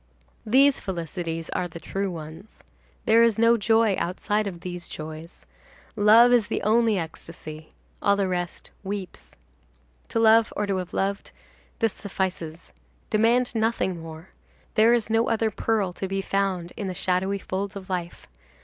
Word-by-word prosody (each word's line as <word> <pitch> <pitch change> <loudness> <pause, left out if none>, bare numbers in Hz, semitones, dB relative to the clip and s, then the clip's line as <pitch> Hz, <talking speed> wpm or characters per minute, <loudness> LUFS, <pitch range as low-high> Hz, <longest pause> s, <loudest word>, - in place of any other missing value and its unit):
These 270 +4 +5
felicities 165 -2 -4
are 180 - -1
the 170 -1 -10
true 195 +3 -3
ones. 160 +4 -10 0.4
There 225 +1 +5
is 230 -3 +4
no 230 +1 +5
joy 225 -1 +3
outside 205 +4 -1
of 175 -3 -7
these 175 -1 -7
joys. 155 +2 -8 0.5
Love 225 +3 +6
is 230 -4 +3
the - - -2
only 225 0 +3
ecstasy. 160 -2 -8 0.3
All 200 - +3
the 200 -1 0
rest 175 -1 -4
weeps. 190 - -6 0.7
To - - -3
love, 225 0 +5
or 210 - 0
to 195 -2 -1
have 180 -1 -5
loved,—this 200 +2 -3
suffices. 185 -5 -4 0.4
Demand 235 +3 +3
nothing 220 -6 0
more. 160 +2 -10 0.4
There 220 +2 +5
is 225 -2 -2
no 225 +1 +2
other 225 -1 +1
pearl 205 -4 0
to 190 - -4
be 195 0 -2
found 190 -4 -1
in 200 - -4
the 185 - -4
shadowy 185 +3 0
folds 195 +1 -4
of 190 -1 -8
life. 175 -2 -5
195 Hz, 150 wpm, -25 LUFS, 175-220 Hz, 0.7 s, Love